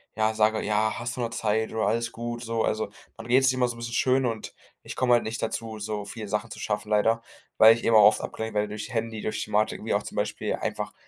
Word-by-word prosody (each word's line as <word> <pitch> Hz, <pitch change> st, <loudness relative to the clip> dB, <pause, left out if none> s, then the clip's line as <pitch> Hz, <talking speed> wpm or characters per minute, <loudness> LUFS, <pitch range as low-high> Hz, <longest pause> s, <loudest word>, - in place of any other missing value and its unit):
ja, 110 Hz, 0 st, +1 dB
sage: 110 Hz, 0 st, +2 dB
„Ja, 110 Hz, +1 st, +1 dB
hast 120 Hz, +1 st, -4 dB
doch -, -, -2 dB
noch 115 Hz, -, -1 dB
Zeit 110 Hz, 0 st, -1 dB
oder 110 Hz, -, -1 dB
alles 115 Hz, 0 st, 0 dB
gut 120 Hz, +1 st, -5 dB
so.“ 115 Hz, -1 st, -1 dB
Also, 110 Hz, -, -1 dB, 0.3 s
man -, -, -10 dB
redet 130 Hz, +2 st, +4 dB
es 130 Hz, -, +5 dB
sich -, -, +2 dB
immer 125 Hz, -1 st, +3 dB
so 120 Hz, -, -4 dB
'n -, -, -13 dB
bisschen 115 Hz, 0 st, -6 dB
schön 130 Hz, +2 st, +2 dB
und 115 Hz, -2 st, -4 dB, 0.3 s
ich -, -, -8 dB
komme 125 Hz, -1 st, +3 dB
halt 120 Hz, -, +5 dB
nicht 115 Hz, +2 st, -4 dB
dazu, 110 Hz, -1 st, -3 dB
so 105 Hz, -1 st, -4 dB
viele 105 Hz, +1 st, -7 dB
Sachen 105 Hz, +2 st, -2 dB
zu -, -, -9 dB
schaffen 105 Hz, 0 st, -3 dB
leider, 115 Hz, +2 st, +2 dB, 0.4 s
weil 110 Hz, +1 st, +9 dB
ich 115 Hz, -, -8 dB
eben 115 Hz, -, +3 dB
auch 105 Hz, -, +8 dB
oft 105 Hz, -, +2 dB
abgelenkt 110 Hz, -1 st, -5 dB
werde 105 Hz, 0 st, +1 dB
durch 105 Hz, +4 st, -6 dB
Handy, 115 Hz, -2 st, -3 dB
durch 110 Hz, -, -2 dB
Thematiken, 105 Hz, 0 st, 0 dB
wie -, -, 0 dB
auch -, -, +2 dB
zum -, -, -9 dB
Beispiel -, -, -1 dB
einfach -, -, -4 dB
110 Hz, 265 wpm, -26 LUFS, 110-115 Hz, 0.4 s, weil